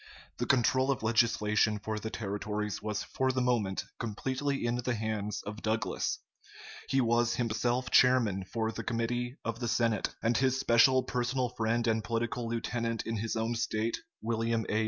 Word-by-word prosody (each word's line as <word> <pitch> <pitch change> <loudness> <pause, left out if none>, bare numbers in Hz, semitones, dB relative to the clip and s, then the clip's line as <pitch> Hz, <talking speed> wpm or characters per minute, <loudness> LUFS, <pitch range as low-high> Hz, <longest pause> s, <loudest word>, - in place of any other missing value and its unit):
The - - -1
control 130 +1 +3
of 135 -4 0
legislation 110 -2 +2
for 105 +1 -4
the 110 - -4
territories 105 0 -3
was 105 0 -2
for 130 0 0
the 130 - -1
moment 115 -6 +1 0.2
completely 130 +5 -2
in 120 +1 +1
the 125 0 -1
hands 105 -2 -3
of 105 +1 -7
Douglas. 110 0 -1 0.7
He 135 - +3
was 120 -1 +2
himself 120 +2 0
chairman 120 -7 +4
of 110 -1 0
the - - -5
Committee 120 +2 -2
of 115 0 -3
the 120 - -2
Senate; 115 -2 +1
and 115 +1 +2
his 130 0 +2
special 130 +1 +5
personal 125 +1 -1
friend 115 0 0
and 110 -1 +1
political 115 +1 -2
lieutenant 115 0 -2
in 115 0 -2
his 115 +2 -2
own 115 +1 0
State, 115 0 -1 0.2
William 115 0 0
A. 105 - +1
115 Hz, 165 wpm, -31 LUFS, 110-125 Hz, 0.7 s, special